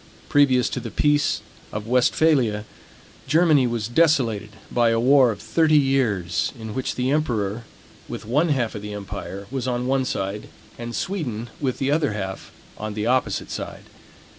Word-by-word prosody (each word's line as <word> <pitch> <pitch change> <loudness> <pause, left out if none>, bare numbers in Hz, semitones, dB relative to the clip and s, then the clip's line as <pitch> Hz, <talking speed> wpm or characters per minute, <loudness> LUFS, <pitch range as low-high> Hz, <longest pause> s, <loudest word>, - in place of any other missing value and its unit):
Previous 130 -4 +4
to - - -3
the 115 -1 -6
peace 145 +4 +2 0.3
of 105 0 -5
Westphalia, 125 -2 +2 0.6
Germany 155 -5 +4
was 115 -2 -2
desolated 120 -7 +2 0.2
by 120 -1 +3
a 115 0 +2
war 130 +1 +5
of 105 -3 -3
thirty 155 +7 +3
years, 120 - +1
in 110 -1 -6
which 130 - -2
the 125 +1 0
emperor, 115 -7 -1 0.4
with - - -6
one 145 +9 +2
half 130 -6 0
of 105 - -6
the 105 0 -6
empire, 100 -1 -6
was 130 -1 -3
on 125 0 -1
one 130 0 +1
side, 100 -2 -3 0.3
and 120 0 -6
Sweden, 120 - -3
with 130 -4 -1
the 135 +1 0
other 145 -6 +1
half, 95 -2 -5 0.3
on 110 -1 -4
the 105 0 -2
opposite 120 -4 0
side. - - -6
120 Hz, 165 wpm, -23 LUFS, 105-140 Hz, 0.6 s, war